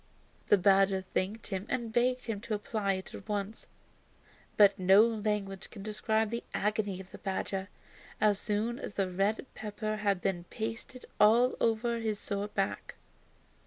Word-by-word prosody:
The 205 - +7
badger 195 0 +4
thanked 195 +4 -3
him 195 +2 -3
and 235 -3 -2
begged 250 +1 +2
him 220 -4 -3
to 225 -1 -2
apply 205 -1 -1
it 190 0 -6
at 205 - -10
once. 205 +1 -3 0.9
But 205 -1 +6
no 190 +4 +7
language 210 -4 -2
can 200 -4 -10
describe 220 +1 0
the 235 - -3
agony 205 -2 0
of 190 -1 -11
the - - -10
badger 195 0 -3 0.5
as 210 -2 +3
soon 220 +4 -1
as 205 - -7
the 190 -2 0
red 200 +7 0
pepper 215 0 -4
had 200 -3 +1
been 175 -2 -2
pasted 230 +5 -6
all 235 +4 +5
over 230 +1 +1
his 220 -2 -1
sore 200 0 -3
back. - - -3
210 Hz, 160 wpm, -31 LUFS, 195-225 Hz, 0.9 s, The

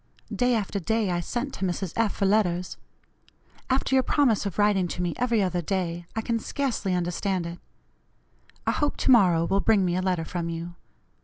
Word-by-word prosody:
Day 245 -1 +2
after 205 -2 -2
day 215 +1 0
I 175 - 0
sent 245 - -3
to - - -8
Mrs. 185 -1 -2
F. 225 -3 +1
for 195 - 0
letters. 185 -3 +1 0.9
After 265 +1 +1
your 260 - +5
promise 250 -7 +2
of 195 - -6
writing 205 -3 +3
to 175 - -6
me 175 -2 -1
every 235 -4 +1
other 180 -1 -1
day, 175 -1 -3
I 220 - 0
can 230 0 -1
scarcely 225 -7 -2
understand 180 +1 -1
it. 170 +1 -7 1.1
I - - +2
hope 295 -1 -1
to - - +2
morrow 180 -8 +5
will 195 +3 +1
bring 200 -3 +3
me 175 -1 0
a 185 - 0
letter 180 -3 0
from 170 0 -3
you. 165 +1 -5
190 Hz, 190 wpm, -26 LUFS, 175-225 Hz, 1.1 s, your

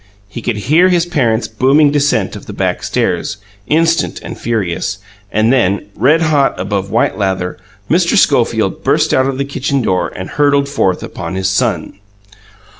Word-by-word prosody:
He 120 +4 -8
could 115 -1 -2
hear 155 - +3
his 175 -2 +2
parent's 120 - 0
booming 140 +3 +3
descent 145 0 +1
of - - -10
the - - -7
back - - -1
stairs, - - -1 0.3
instant 165 +2 +1
and - - -7
furious; 105 -8 -2 0.3
and 110 +4 +2
then, 100 -5 +1
red 150 +9 +3
hot 145 -4 +1
above 100 0 -2
white - - 0
lather, 95 -2 -2 0.3
Mr. 175 +5 +2
Schofield 115 - +1
burst 150 +3 +2
out 130 0 +3
of 135 -1 -2
the 140 - -1
kitchen 140 -1 -2
door 95 -3 0
and 95 +1 -6
hurtled 140 -1 +2
forth 95 -10 0
upon - - -6
his 95 0 0
son. 95 0 -1
130 Hz, 165 wpm, -15 LUFS, 100-145 Hz, 0.3 s, hear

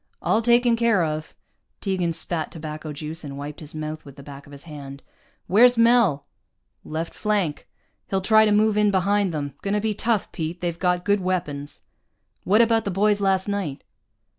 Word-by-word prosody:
"All 220 - +1
taken 240 0 +4
care 230 -6 +2
of." 155 0 -4 0.4
Tegan 185 -4 -1
spat 165 0 -2
tobacco 155 -1 -7
juice, 155 +3 -7
and 140 -2 -7
wiped 145 +1 -7
his 155 0 -8
mouth 155 0 -5
with 140 -2 -13
the 140 - -12
back 140 0 -11
of - - -15
his 140 0 -11
hand. 140 -4 -10 0.4
"Where's 245 +5 +5
Mel?" 230 - +4 0.6
"Left 160 +2 -5
flank. 205 -8 -1 0.4
He'll 195 - +1
try 220 +3 +5
to 210 - +2
move 210 0 +3
in 210 -1 +4
behind 200 0 +1
them. 145 -3 -4
Gonna 200 +1 0
be 215 0 -1
tough, 215 0 -1
Pete, 165 +1 -4
they've 170 -1 -3
got 180 -1 0
good 205 0 +3
weapons." 150 -6 -3 0.6
"What 210 +5 +4
about 225 -1 +3
the 200 - -3
boys 205 +2 +1
last 190 -1 +1
night?" 200 -9 -3
180 Hz, 180 wpm, -23 LUFS, 155-210 Hz, 0.6 s, Where's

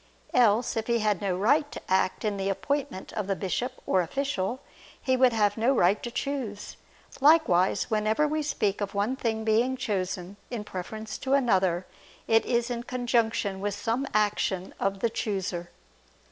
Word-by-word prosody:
Else, 235 -1 +3
if 225 -1 -2
he 235 -1 +2
had 210 -4 0
no 190 -3 0
right 285 +9 +2
to - - -6
act 190 +2 +1
in 205 -1 0
the 195 0 -1
appointment 195 -2 -3
of 210 -3 -3
the 195 - 0
bishop 240 +7 -2
or 185 - +3
official, 245 - -2 0.4
he 260 - +1
would 255 -1 +5
have 210 -2 +1
no 240 +5 +3
right 195 -1 +3
to 240 - -4
choose. 240 -5 -4 0.4
Likewise, 270 - +4
whenever 215 +7 +2
we 310 +1 -1
speak 210 -9 -1
of 200 0 -3
one 205 +6 +1
thing 220 -3 -2
being 230 +4 +2
chosen 190 -4 -3
in 235 -4 -4
preference 215 +3 -6
to 270 0 +1
another, 190 -9 +2 0.4
it 225 0 +4
is 240 0 +1
in 235 -1 -2
conjunction 235 -5 0
with 205 0 -1
some 240 +6 -1
action 205 -3 0
of 195 0 -1
the 235 - +2
chooser. 185 -6 -3
215 Hz, 170 wpm, -27 LUFS, 195-245 Hz, 0.4 s, would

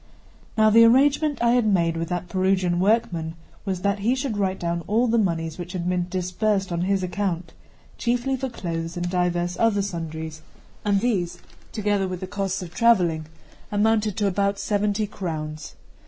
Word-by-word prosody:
Now 215 0 +5
the 230 +2 +8
arrangement 280 +4 +4
I 235 - +4
had 245 -2 +3
made 170 -5 +2
with 165 0 -3
that 180 0 -3
Perugian 185 -1 +1
workman 180 -6 +1 0.3
was 190 -3 -2
that 200 0 +1
he 230 +6 +2
should 260 -4 -2
write 190 -2 -1
down 170 0 -1
all 225 +4 +3
the 230 0 +3
monies 165 -4 -1
which 175 +1 -6
had 180 -2 -3
been 180 -1 0
disbursed 190 +2 -1
on 170 0 -1
his 190 +1 +1
account, 180 -3 -2 0.5
chiefly 245 +2 0
for 265 0 -3
clothes 165 -6 -4
and 175 0 -2
divers 175 -1 0
other 215 -3 +3
sundries; 160 -4 -5 0.4
and 200 -2 +2
these, 195 -8 0 0.3
together 205 -2 0
with 185 -1 -4
the 185 - -4
costs 195 -1 -2
of 175 -1 -10
travelling, 175 -10 +3 0.4
amounted 210 -1 +2
to 210 - +1
about 200 +1 +1
seventy 205 +1 0
crowns. 155 -6 -5
190 Hz, 170 wpm, -24 LUFS, 175-215 Hz, 0.5 s, the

